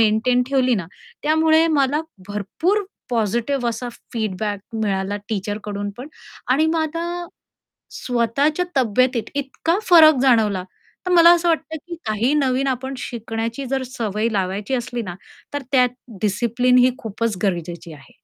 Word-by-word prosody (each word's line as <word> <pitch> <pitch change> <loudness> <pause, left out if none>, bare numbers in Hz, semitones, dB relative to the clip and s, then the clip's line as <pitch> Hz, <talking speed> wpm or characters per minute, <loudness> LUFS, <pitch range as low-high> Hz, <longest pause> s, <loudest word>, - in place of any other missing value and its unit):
Maintain 225 +3 +3
ठेवली 255 -2 +3
ना, 190 -6 -3 0.4
त्यामुळे 315 +1 +4
मला 280 +2 +2 0.3
भरपूर 325 - -1 0.3
पॉझिटिव 235 +3 0
असा 235 +2 -4 0.2
फीडबॅक 210 -2 -2 0.2
मिळाला 195 -1 -1
टीचरकडून 205 -1 -3
पण. 260 +4 -7 0.4
आणि 280 +5 +3
माझा 330 +2 -2 0.7
स्वतःच्या 270 - 0
तब्येतीत 250 0 +2
इतका 290 +5 -1
फरक 320 -3 +8
जाणवला, 220 -7 +3 0.4
तर 365 - 0
मला 340 -1 +8
असं 345 0 0
वाटतं, 320 -1 0
की 345 - -4
काही 220 +5 +1
नवीन 270 -2 +1
आपण 265 +1 -3
शिकण्याची 230 +2 -4
जर 265 +1 -1
सवय 225 -3 -2
लावायची 200 +4 -1
असली 245 -1 -3
ना, 180 -5 -6 0.4
तर 285 - -2
त्यात 250 -2 +5 0.3
डिसिप्लिन 235 +5 +2
ही 250 +1 +5
खूपच 225 0 -3
गरजेची 170 -3 -3
आहे. 135 -2 -17
245 Hz, 130 wpm, -21 LUFS, 210-280 Hz, 0.7 s, फरक